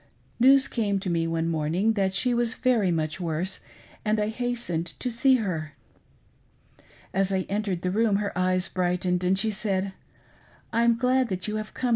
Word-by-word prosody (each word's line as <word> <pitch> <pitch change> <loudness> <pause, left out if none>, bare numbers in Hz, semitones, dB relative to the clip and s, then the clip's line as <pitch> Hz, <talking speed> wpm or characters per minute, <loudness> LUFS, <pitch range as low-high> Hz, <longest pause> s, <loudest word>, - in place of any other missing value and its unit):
News 270 +2 +6
came 205 -4 -1
to 185 - -2
me 165 -1 0
one 165 0 -1
morning 165 +7 0
that 195 -2 0
she 250 +4 +2
was 235 -1 +2
very 235 -7 +2
much 155 -1 -1
worse, 175 +2 -2 0.4
and 215 0 +1
I 210 0 0
hastened 230 -8 -2
to 250 - -2
see 260 +3 +4
her. 165 - -3 1.4
As 195 +1 +1
I 190 -1 +1
entered 200 -3 -2
the 180 - 0
room, 215 +1 +2
her 200 0 -2
eyes 185 0 +1
brightened, 180 0 -1
and 185 +1 +2
she 220 +3 +2
said: 195 -2 -1 0.4
" - - -30
I'm 230 0 +3
glad 255 0 +2
that 185 0 -3
you 215 0 -2
have 215 0 -7
come. 255 - -1
195 Hz, 180 wpm, -26 LUFS, 180-230 Hz, 1.4 s, News